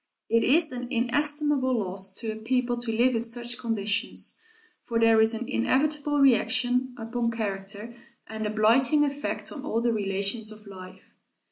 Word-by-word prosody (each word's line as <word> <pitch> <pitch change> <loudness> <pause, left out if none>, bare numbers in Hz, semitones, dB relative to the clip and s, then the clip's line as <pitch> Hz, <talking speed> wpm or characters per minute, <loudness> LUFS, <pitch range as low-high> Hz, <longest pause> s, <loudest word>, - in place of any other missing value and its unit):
It 230 0 +3
is 310 +4 +3
an 245 -1 -5
inestimable 285 +1 0
loss 195 -1 -2
to 225 -2 -3
a - - -6
people 245 +2 0
to 240 -1 -2
live 240 +3 +3
in 230 - 0
such 240 +1 -3
conditions, 215 -3 -1 0.4
for 230 -1 -1
there 225 -1 +5
is 220 +1 +3
an 235 +1 -5
inevitable 290 - 0
reaction 250 -1 +2
upon 230 +1 -2
character 210 0 -4 0.3
and 220 -1 -4
a - - -2
blighting 240 +7 +3
effect 285 +1 -3
on 285 -4 -7
all 230 -6 -1
the 235 0 +1
relations 200 +2 -1
of 215 0 -11
life. 185 -1 -12
235 Hz, 160 wpm, -26 LUFS, 215-255 Hz, 0.4 s, there